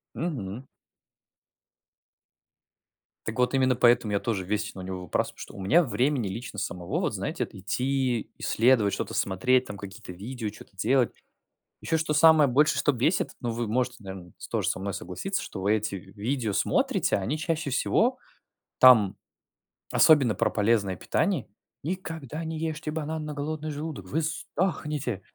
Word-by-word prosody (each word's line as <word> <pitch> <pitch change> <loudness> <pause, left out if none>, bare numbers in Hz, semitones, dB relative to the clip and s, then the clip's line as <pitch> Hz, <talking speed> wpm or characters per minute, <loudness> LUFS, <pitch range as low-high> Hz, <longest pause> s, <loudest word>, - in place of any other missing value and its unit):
Мгм. 130 - -4 2.6
Так 110 +2 -3
вот 125 +2 +2
именно 130 -1 +3
поэтому 120 -3 +4
я 100 - +2
тоже 100 -5 -2
весь 105 +2 -2
на 95 - -7
него 90 0 -5
выпрас 85 - -1
что - - -10
у 100 - -7
меня 160 - +5
времени 125 -1 0
лично 105 +1 -5
самого, 90 -2 -3
вот - - -1
знаете, - - -2
это - - -14
идти, 125 +4 -1
исследовать, 115 -3 +3
что-то - - -3
смотреть 125 +7 +2
там, 100 - -7
какие-то 100 0 -9
видео 110 +4 -5
чё-то 100 - -14
делать 120 +6 +2 0.7
Еще, 160 - 0
что 160 -1 -1
самое 155 -2 +6
больше, 150 +5 +3
что 145 - +3
бесит, 135 +9 +1
но 120 - -1
вы 115 0 -2
можете, 125 +2 0
наверное, 95 -3 -8 0.2
тоже - - 0
со - - -2
мной 100 0 -3
согласиться, 190 - -3
что 95 - -7
вы 100 +2 +3
эти 110 -1 -1
видео 105 +4 -3
смотрите, - - +1
они 115 +11 -2
чаще 160 -2 -2
всего 245 - +2 0.6
там 110 -6 +7 0.8
особенно 135 -8 +6
про - - +2
полезное 105 -3 +1
питание: 160 - 0 0.4
никогда 160 -3 -5
не 160 0 -4
ешьте 160 -1 -3
банан 155 0 -3
на 150 - -5
голодный 155 +1 -3
желудок, 150 - -5
вы 160 - 0
сдохнете! 150 - -2
125 Hz, 155 wpm, -27 LUFS, 100-150 Hz, 2.6 s, там